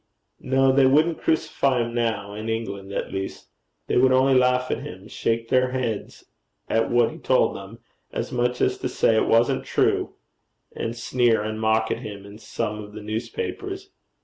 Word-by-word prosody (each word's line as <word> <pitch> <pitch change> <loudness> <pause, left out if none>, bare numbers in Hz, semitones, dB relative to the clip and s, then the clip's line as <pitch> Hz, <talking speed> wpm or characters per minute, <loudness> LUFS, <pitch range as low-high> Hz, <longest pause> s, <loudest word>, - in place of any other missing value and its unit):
'No, 135 0 +3
they 135 0 +5
wouldn't 155 +5 +3
crucify 140 -5 +1
him 115 0 -5
now 110 -4 -1
in 110 +2 -5
England 100 -4 -4
at - - -4
least. 95 0 -5 0.4
They - - 0
would 130 +1 +5
only 130 +1 +4
laugh 125 0 +3
at - - -1
him, - - -9
shake 115 0 -2
their 130 0 +3
heads 120 -5 -3 0.4
at 115 0 +1
what 120 -1 +3
he 160 - -11
told 130 -3 +2
them, 100 +4 -9 0.3
as - - -4
much 125 0 0
as - - +1
to - - -2
say 110 - +2
it 110 - +2
wasn't 115 +1 +3
true, - - 0 0.6
and 115 +1 -4
sneer 120 -2 +2
and 110 +1 -4
mock 110 0 +2
at - - -1
him 100 -2 -8
in 100 +1 -12
some 105 -1 -4
of 105 0 -12
the 110 0 -8
newspapers.' 385 - -5
115 Hz, 180 wpm, -24 LUFS, 110-130 Hz, 0.6 s, they